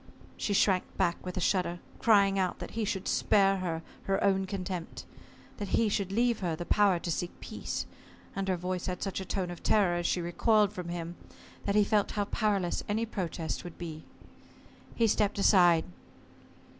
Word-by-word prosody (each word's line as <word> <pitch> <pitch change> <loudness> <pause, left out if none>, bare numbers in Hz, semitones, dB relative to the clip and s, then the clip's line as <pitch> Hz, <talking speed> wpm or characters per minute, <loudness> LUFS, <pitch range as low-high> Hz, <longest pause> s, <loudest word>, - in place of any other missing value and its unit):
She 205 - -2
shrank 190 -2 +3
back 175 -3 0
with 180 0 -5
a - - +1
shudder, 180 -1 +1 0.2
crying 200 -3 +4
out 185 -1 0
that - - -7
he 225 -1 -2
should 195 -2 -3
spare 195 -1 +3
her 165 -3 -3 0.2
her 195 0 0
own 195 -1 +2
contempt 185 -3 -5 0.5
that 205 -2 -1
he 225 -2 +3
should 200 -2 -1
leave 235 +2 +2
her 175 -4 -1
the 175 +2 -6
power 200 -2 +4
to 170 0 -4
seek 175 +2 -3
peace - - -4 0.5
and 195 0 -2
her 185 -1 +1
voice 180 0 -3
had 180 -1 -3
such 195 -1 -3
a - - -5
tone 185 -1 -2
of 175 - -9
terror, 190 -5 +3
as 175 - -1
she - - +1
recoiled 205 +4 +2
from 180 -3 -6
him, 170 0 -5 0.5
that 200 - 0
he 210 - +6
felt 205 0 +1
how 205 -1 0
powerless 200 -4 0
any 220 +2 0
protest 175 -7 -4
would 175 - -9
be. 160 -3 -7 0.9
He 230 - +3
stepped 210 -2 +1
aside. 175 -5 +5
190 Hz, 185 wpm, -30 LUFS, 175-205 Hz, 0.9 s, he